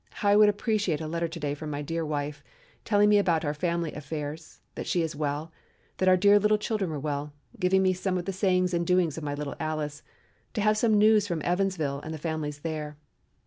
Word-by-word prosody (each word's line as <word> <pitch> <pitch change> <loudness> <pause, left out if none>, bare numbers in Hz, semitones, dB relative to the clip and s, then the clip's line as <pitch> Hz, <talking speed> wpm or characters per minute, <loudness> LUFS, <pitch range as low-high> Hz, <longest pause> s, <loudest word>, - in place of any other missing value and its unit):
How 205 - 0
I 200 - +6
would 210 0 +7
appreciate 205 -5 0
a 160 - -5
letter 170 +2 -2
to 165 +1 -8
day 145 -2 -2
from 150 +1 -6
my 145 0 -3
dear 165 +2 -2
wife, 145 -1 -3 0.4
telling 205 -1 +3
me 210 0 +5
about 170 -5 +1
our 145 - 0
family 170 0 -2
affairs, 150 +1 -6
that - - -6
she 175 - +1
was 160 -1 -3
well, 150 +2 -3 0.5
that 185 - +3
our 185 - +6
dear 205 +2 +6
little 210 +1 +3
children 210 -3 -2
were 155 - -3
well, 145 0 -3 0.3
giving 190 +1 +3
me 185 0 +3
some 185 0 -1
of 175 - -4
the 195 - -3
sayings 185 -1 +1
and 170 0 0
doings 175 -4 +2
of - - -9
my 145 -1 -2
little 145 -1 -4
Alice, 155 -1 -3 0.5
to 215 - 0
have 215 +1 +3
some 215 0 +3
news 210 0 +5
from 170 -5 -3
Evansville 175 -6 0
and 160 +2 -6
the - - -6
families 150 -2 -4
there. 150 -2 -4
165 Hz, 225 wpm, -27 LUFS, 150-195 Hz, 0.5 s, would